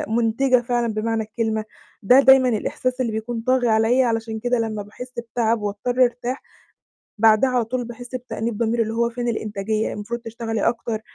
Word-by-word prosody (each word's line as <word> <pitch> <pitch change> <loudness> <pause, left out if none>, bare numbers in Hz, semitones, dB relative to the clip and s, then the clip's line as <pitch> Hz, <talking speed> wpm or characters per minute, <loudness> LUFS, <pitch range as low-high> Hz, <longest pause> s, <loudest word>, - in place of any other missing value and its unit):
مُنتِجة 240 +2 +2
فعلًا 240 -1 -1
بمعنى 220 +1 -1
الكلمة، 220 0 -2 0.4
ده 250 +7 +7
دايمًا 265 -2 +6
الإحساس 250 +3 -2
اللي 235 -3 0
بيكون 225 +1 -4
طاغي 255 0 +2
عليّا، 225 +4 +3
علشان 225 -1 -2
كده 245 +1 0
لمّا 215 -2 -2
باحس 250 +5 -10 0.2
بتعب 230 -2 +1
وأضطر 225 +5 0
أرتاح، 245 +2 -1 0.8
بعدها 220 +4 +5
على 250 -2 +1
طول 245 +2 -3
باحس 240 +2 -10
بتأنيب 235 -3 -4
ضمير، 230 0 +1
اللي 220 0 -3
هو 235 +1 +1
فين 240 0 -3
الإنتاجية، 215 -1 -2
المفروض 230 +3 -5
تشتغلي 225 -1 -2
أكتر. 230 -2 -3
230 Hz, 165 wpm, -22 LUFS, 220-245 Hz, 0.8 s, ده